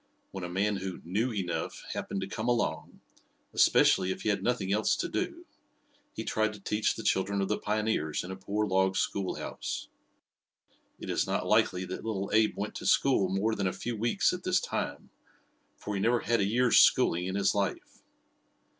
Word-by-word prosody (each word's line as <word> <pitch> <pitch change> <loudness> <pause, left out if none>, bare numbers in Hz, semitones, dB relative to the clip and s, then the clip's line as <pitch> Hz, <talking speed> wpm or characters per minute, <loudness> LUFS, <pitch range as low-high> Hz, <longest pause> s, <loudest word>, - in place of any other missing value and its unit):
When 95 -2 -6
a 90 - -4
man 100 +3 0
who 95 -1 -5
"knew 105 +9 0
enough" 95 -5 -3
happened 95 - -4
to 95 - -3
come 110 +3 -4
along, 120 -1 -1 0.5
especially 90 - +4
if 95 0 -5
he - - 0
had 100 - +1
nothing 105 -6 0
else 105 +1 +2
to - - -2
do, - - -3 0.7
he - - -5
tried 110 0 0
to 105 - -11
teach 105 +2 0
the 110 - -6
children 100 +1 +1
of 95 - -1
the 105 - 0
pioneers 105 -8 -1
in 90 - -7
a - - -4
poor 100 +3 -2
log 95 -1 +2
schoolhouse. 95 -1 -3 1.1
It - - -5
is - - 0
not - - -1
likely 90 +1 +2
that 90 - -6
little 100 -3 -3
Abe 110 0 +3
went 105 +1 -3
to - - -8
school 115 -9 +3
more 100 +4 0
than 100 -3 -1
a 90 - -1
few 120 -1 -4
weeks 120 - +1
at 180 - -4
this 185 0 +2
time, - - -4 0.7
for 105 - -5
he 100 - -1
never 120 +3 +2
had 115 +1 +1
a 100 - +2
year's 120 +3 +4
schooling 90 +2 +4
in 95 - -3
his 100 - +2
life. 100 -2 -3
100 Hz, 190 wpm, -29 LUFS, 95-110 Hz, 1.1 s, especially